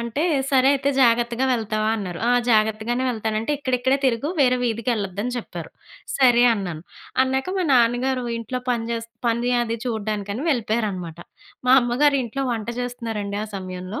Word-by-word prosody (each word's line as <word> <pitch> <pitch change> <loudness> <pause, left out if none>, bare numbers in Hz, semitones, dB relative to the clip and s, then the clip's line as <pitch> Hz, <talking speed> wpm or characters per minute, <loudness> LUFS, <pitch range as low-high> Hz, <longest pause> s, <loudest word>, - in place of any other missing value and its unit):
అంటే, 235 +5 -2 0.3
"సరే 265 -1 +4
అయితే 280 0 0
జాగ్రత్తగా 240 +1 +3
వెళ్తావా?" 215 -2 -1
అన్నారు. 180 -5 -5
ఆ - - +4 0.2
జాగ్రత్తగానే 220 +3 +1
వెళ్తానంటే, 220 +2 -2
"ఇక్కడిక్కడే 260 -1 +1
తిరుగు 250 +3 0
వేరే 255 -2 +4
వీధికెళ్ళద్దని" 225 -1 -2
చెప్పారు. 235 - -8 0.5
సరే 245 -3 +5
అన్నాను. 175 -7 -5 0.4
అన్నాక, 265 +3 -1
మా 370 - +1
నాన్నగారు 245 +2 +2
ఇంట్లో 240 +3 -4
పని 235 -2 -1
చేస్ 230 0 -4 0.2
పనీ 235 +2 0
అది 230 -1 -2
చూడడానికని 215 +1 -3
వెళ్ళిపోయారనమాట. 215 - -2 0.5
మా 255 - +8
అమ్మగారు 275 +4 +2
ఇంట్లో 270 +4 -3
వంట 225 -1 -4
చేస్తున్నారండి 225 -5 -4
ఆ - - -8
సమయంలో. 185 +1 -6
235 Hz, 140 wpm, -23 LUFS, 215-250 Hz, 0.5 s, మా